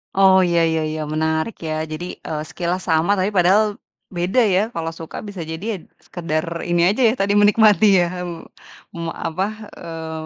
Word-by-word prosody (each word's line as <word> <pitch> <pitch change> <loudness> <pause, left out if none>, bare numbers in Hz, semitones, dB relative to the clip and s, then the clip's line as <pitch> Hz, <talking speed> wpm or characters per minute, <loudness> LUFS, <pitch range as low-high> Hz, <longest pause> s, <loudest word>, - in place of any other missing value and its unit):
Oh 190 -1 +6
ya 170 -1 +2
ya 160 -1 0
ya, 155 0 -3
menarik 160 +6 -1
ya, 155 0 -3
jadi, 155 +3 -6
eee, 155 -1 -5
skill-nya 175 +3 -3
sama, 165 +4 +2
tapi 190 +2 0
padahal 200 +3 +3 0.3
beda 185 +8 +1
ya, 195 -2 +3
kalau 165 0 -3
suka 165 - -7
bisa 200 -3 -8
jadi 160 +4 -6
ya 200 - -3 0.3
sekedar, 160 -3 -3 0.2
ini 175 0 +2
aja 255 - -2
ya 220 - +3
tadi, 200 -1 0
menikmati 210 0 +5 0.2
ya, - - 0 0.2
mmm, 170 -1 -7 0.5
me 170 -1 -5
apa, 165 +4 -2 0.3
eee, 160 -1 -7
175 Hz, 175 wpm, -20 LUFS, 160-195 Hz, 0.5 s, Oh